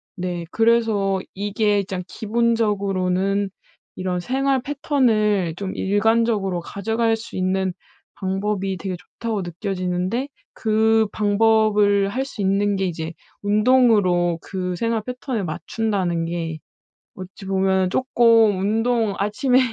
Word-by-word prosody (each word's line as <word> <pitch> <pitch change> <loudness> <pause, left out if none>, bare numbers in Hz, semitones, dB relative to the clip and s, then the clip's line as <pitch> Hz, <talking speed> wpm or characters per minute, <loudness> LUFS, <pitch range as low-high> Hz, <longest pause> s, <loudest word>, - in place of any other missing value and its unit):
네. 175 -2 -4
그래서 225 -4 +2
이게 205 0 0
장 185 -1 -5
기본적으로는 200 -4 0 0.5
이런 185 -1 -2
생활 265 +5 0
패턴을 220 - +1
좀 190 0 -4
일관적으로 205 -2 +1
가져갈 225 +5 -1
수 225 - -10
있는 185 0 0 0.4
방법이 195 0 -2
되게 185 +1 -4
좋다고 215 +3 -5
느껴지는데 185 - -2 0.3
그 220 0 +2
방법을 210 -1 +3
할 260 +5 -2
수 220 - -7
있는 200 +1 +1
게 190 0 0
이제 165 -2 -4 0.3
운동으로 205 -6 +3
그 180 -2 -4
생활 230 +3 -1
패턴을 250 -4 -4
맞춘다는 180 -1 -2
게 165 -1 -3 0.6
어찌 185 +1 -10
보면 190 -1 +1
조금 230 -4 +4
운동 225 +1 +1
아침에 245 +6 +2
205 Hz, 250 characters per minute, -22 LUFS, 185-225 Hz, 0.6 s, 조금